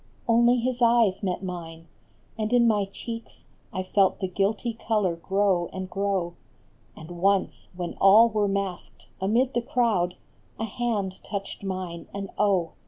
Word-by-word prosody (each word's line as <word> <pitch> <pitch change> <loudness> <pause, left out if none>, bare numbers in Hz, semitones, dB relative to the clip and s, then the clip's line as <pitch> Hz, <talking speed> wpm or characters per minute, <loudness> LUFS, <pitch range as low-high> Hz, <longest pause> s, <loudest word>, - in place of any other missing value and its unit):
Only 235 +1 +5
his 245 +1 -2
eyes 230 -5 +4
met 190 -1 -2
mine, 165 -3 -7 0.5
and 215 0 -2
in 240 -1 +5
my 210 -3 +2
cheeks 230 +4 -8 0.3
I 185 -4 -3
felt 190 +1 +2
the 190 - -1
guilty 205 +5 -1
color 210 -6 0
grow 190 0 +1
and 190 0 -6
grow; 195 -3 -1 0.6
And 160 +2 -10
once, 195 0 +1
when 175 -1 -4
all 210 +4 +8
were 210 -2 0
masqued, 195 -2 -4 0.2
amid 235 +7 +2
the 240 - +1
crowd 220 -8 +1 0.4
A 225 - -2
hand 210 -4 -3
touched 200 -1 -5
mine, 185 -3 -5
and 195 -1 -5
oh. 190 -5 +2
200 Hz, 150 wpm, -26 LUFS, 185-230 Hz, 0.6 s, all